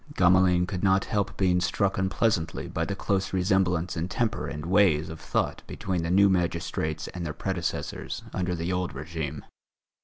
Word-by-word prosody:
Gamelin 90 -1 +4
could 90 -1 -4
not 95 0 +3
help 100 -3 -1
being 90 -2 +2
struck 95 +2 0
unpleasantly 95 -3 0
by 80 - -2
the 100 - -3
close 95 -1 -1
resemblance 90 -2 +1
in 80 +3 -2
temper 110 - -1
and 75 -1 -5
ways 90 -5 +3
of 80 0 -7
thought - - -1
between 90 -3 -2
the 85 - -2
new 100 +3 +6
magistrates 85 -4 -1
and 90 - -6
their 80 -2 -3
predecessors 90 0 -3
under 90 -1 -1
the 85 +2 -2
old 90 -3 -2
régime. 75 -1 -5
90 Hz, 165 wpm, -27 LUFS, 85-95 Hz, -, new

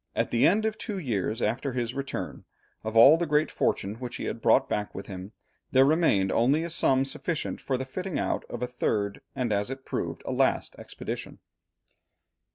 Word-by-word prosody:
At - - 0
the 115 - +4
end 215 +4 +3
of 220 -1 -2
two 210 -4 -4
years 115 - -2
after 130 +2 -1
his 120 -1 -2
return, 140 0 -5 0.4
of 110 +1 -2
all 135 +8 +9
the 170 0 -1
great 150 +1 +2
fortune 100 +3 -1
which 125 -1 -6
he - - -5
had - - -4
brought - - +4
back 105 0 -3
with 95 - -6
him, 95 0 -8 0.4
there 130 0 +6
remained 135 - +3
only 135 +7 +3
a 170 - -4
sum 135 -5 +3
sufficient 160 +4 -3
for 130 - -1
the 130 - -4
fitting 180 +6 -4
out - - -1
of 120 0 -4
a - - 0
third, 105 -5 -1
and 125 -5 0
as 100 +3 0
it 135 0 -7
proved, - - -4
a - - -3
last - - +1
expedition. - - -6
130 Hz, 195 wpm, -27 LUFS, 110-150 Hz, 0.4 s, all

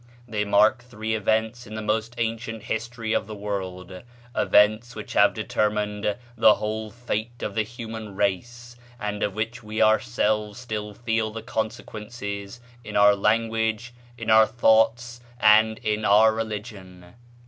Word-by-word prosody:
They 105 -2 -2
mark 105 +4 +4
three 110 -2 -5
events 110 +2 0
in 110 - -8
the 110 - -4
most 110 +2 -1
ancient 115 -1 -3
history 115 0 -3
of - - 0
the 110 - -7
world, 95 -3 -5 0.3
events 110 +4 +3
which - - -7
have - - +4
determined 105 -1 -1 0.2
the 110 -2 +6
whole 110 0 -4
fate 120 +1 -5
of 105 - -3
the 110 - +1
human 110 -2 -7
race, 120 +5 -2 0.2
and 105 0 -4
of 100 - -1
which 115 +2 -3
we 110 0 -5
ourselves 110 -2 +1
still 105 -4 -5
feel 115 -1 -1
the 110 0 -7
consequences 105 -1 -5 0.2
in 105 -2 -8
our 105 0 +6
language, 110 +2 0 0.2
in 115 -1 -2
our 110 0 +7
thoughts, 115 +1 +2 0.2
and 110 +1 +5
in 105 0 -1
our 110 +2 +5
religion." 105 -5 -7
110 Hz, 145 wpm, -25 LUFS, 105-115 Hz, 0.3 s, our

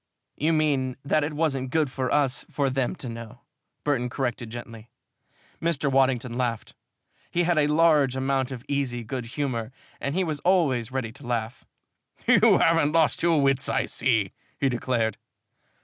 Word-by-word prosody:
"You 155 +3 +1
mean 140 -5 +1
that 150 +1 +2
it 150 +1 -3
wasn't 135 -5 0
good 150 -1 +1
for 130 -1 -2
us 140 -3 +1
for 140 -2 0
them 130 +5 -1
to 135 - -7
know," 115 0 -8 0.4
Burton 130 -4 0
corrected 120 -2 -3
gently. 115 -1 -9 0.7
Mr. 150 -4 0
Waddington 130 -2 +2
laughed. 120 -3 -2 0.6
He 175 - +1
had 170 -2 +2
a 145 - +3
large 150 -4 +4
amount 135 0 0
of 125 0 -7
easy 130 -4 -1
good 125 +1 -5
humor 125 -5 -2 0.3
and 140 +2 -3
he 190 - +2
was 155 -4 -2
always 140 - +2
ready 130 -4 -3
to 130 +1 -13
laugh. 120 0 -3 0.6
"You - - +6
haven't 165 -2 +3
lost 165 -2 +3
your 165 -2 +3
wits, 135 -1 +2
I - - +1
see," 110 -7 0 0.3
he 135 - +1
declared. 115 -3 -1
135 Hz, 165 wpm, -26 LUFS, 120-150 Hz, 0.7 s, You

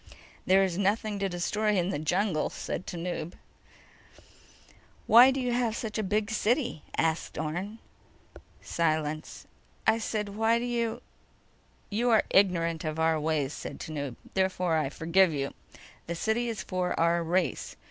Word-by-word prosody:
"There 190 +1 +5
is 185 -1 -1
nothing 205 +1 0
to 195 0 0
destroy 210 +4 0
in 180 0 +1
the 145 - -2
jungle," 175 +1 0
said 180 - -5
Tanub. 175 -1 -4 1.7
"Why 240 +3 +8
do 270 +1 0
you 250 -1 -1
have 240 -2 0
such 220 -2 -4
a - - +2
big 210 +2 -1
city?" 235 - 0 0.2
asked 160 0 0
Orne. 175 +8 -3 0.9
Silence. 155 -2 -2 0.4
"I 220 +1 +4
said: 215 -2 -2
Why 225 +3 +2
do 235 - -2
you—" 235 -2 -2 0.9
"You 235 +4 +1
are 220 -2 +5
ignorant 170 -4 +3
of 155 -1 -3
our 160 0 +2
ways," 150 -2 0
said - - -7
Tanub. 145 -6 -5 0.2
"Therefore, 185 -3 +1
I 155 -4 +1
forgive 170 +4 +3
you. 140 -1 -2 0.5
The 170 - -3
city 225 +7 0
is 225 - -4
for 180 -1 -2
our 170 +1 +3
race. 175 +2 -1
185 Hz, 145 wpm, -28 LUFS, 160-220 Hz, 1.7 s, Why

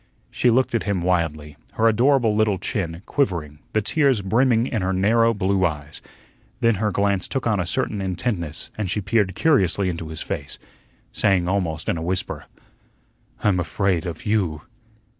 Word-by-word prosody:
She 125 - +2
looked 130 +2 +2
at 115 - +1
him 95 -3 -1
wildly, 75 -5 -1 0.2
her 115 - +2
adorable 120 0 +3
little 105 -2 +2
chin 90 -2 -3
quivering, 85 - -1
the 110 - +1
tears 135 -4 +2
brimming 115 +3 +3
in 110 -5 -2
her 95 +1 0
narrow 115 +5 +3
blue 100 -2 0
eyes. 75 -4 -3 0.6
Then 115 -2 +3
her 105 - +2
glance 100 -2 0
took 135 - -3
on 110 -4 +1
a 90 - -1
certain 100 +3 -1
intentness, 90 -4 -3
and 100 -4 -1
she 105 - 0
peered 100 -2 0
curiously 100 - +2
into 85 -2 -5
his 80 0 -5
face, - - -5 0.6
saying 95 -4 +2
almost 90 -5 -1
in - - 0
a - - -4
whisper: 90 +2 -3 1.0
"I'm 95 -4 +3
afraid 90 0 0
of 80 -2 -7
YOU." 95 -8 0
95 Hz, 165 wpm, -22 LUFS, 85-110 Hz, 1.0 s, adorable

